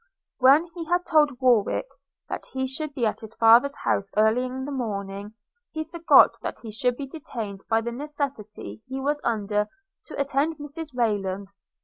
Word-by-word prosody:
When 275 Hz, +5 st, +6 dB
he 340 Hz, -2 st, -6 dB
had 355 Hz, +2 st, +1 dB
told 295 Hz, -5 st, +3 dB
Warwick 250 Hz, -, +3 dB, 0.4 s
that -, -, -5 dB
he 265 Hz, 0 st, -1 dB
should 280 Hz, +3 st, -5 dB
be 240 Hz, -, 0 dB
at 215 Hz, -, -1 dB
his 220 Hz, 0 st, -10 dB
father's 235 Hz, +5 st, +6 dB
house 200 Hz, -7 st, -1 dB
early 220 Hz, +3 st, +4 dB
in 260 Hz, +1 st, -5 dB
the 290 Hz, -, -5 dB
morning, 205 Hz, -4 st, -4 dB, 0.4 s
he 315 Hz, 0 st, -2 dB
forgot 330 Hz, +1 st, +5 dB
that -, -, -4 dB
he 225 Hz, -, -6 dB
should 245 Hz, +3 st, 0 dB
be 280 Hz, -, -4 dB
detained 230 Hz, -9 st, -7 dB
by 225 Hz, 0 st, +3 dB
the 235 Hz, +1 st, -4 dB
necessity 275 Hz, -6 st, -5 dB
he 265 Hz, +1 st, -4 dB
was 290 Hz, +2 st, -1 dB
under 210 Hz, -2 st, 0 dB, 0.4 s
to -, -, -7 dB
attend 280 Hz, +3 st, 0 dB
Mrs 295 Hz, -1 st, -7 dB
Rayland. 200 Hz, -4 st, -1 dB
255 Hz, 170 wpm, -25 LUFS, 220-290 Hz, 0.4 s, When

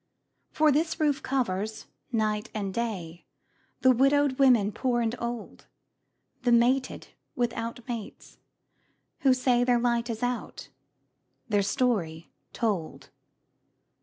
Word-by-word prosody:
For 310 Hz, -1 st, +3 dB
this 320 Hz, +4 st, 0 dB
roof 295 Hz, -3 st, +1 dB
covers, 220 Hz, -5 st, -2 dB, 0.3 s
night 215 Hz, -2 st, -1 dB
and 200 Hz, -3 st, -3 dB
day, 185 Hz, -8 st, -4 dB, 0.5 s
The 260 Hz, -, +6 dB
widowed 275 Hz, +2 st, +3 dB
women 240 Hz, -7 st, +5 dB
poor 240 Hz, +3 st, 0 dB
and 230 Hz, -1 st, 0 dB
old, 235 Hz, -2 st, -6 dB, 0.7 s
The 245 Hz, -1 st, +1 dB
mated 250 Hz, +3 st, +2 dB, 0.3 s
without 235 Hz, 0 st, -3 dB
mates, 230 Hz, -4 st, -7 dB, 0.8 s
who 270 Hz, -, +4 dB
say 250 Hz, -1 st, +2 dB
Their 245 Hz, -1 st, +3 dB
light 235 Hz, 0 st, 0 dB
is 225 Hz, +1 st, -4 dB
out, 245 Hz, -1 st, -4 dB, 0.8 s
their 205 Hz, -2 st, +3 dB
story 195 Hz, -7 st, -1 dB, 0.2 s
told. 200 Hz, -9 st, -3 dB
235 Hz, 110 wpm, -27 LUFS, 215-255 Hz, 0.8 s, The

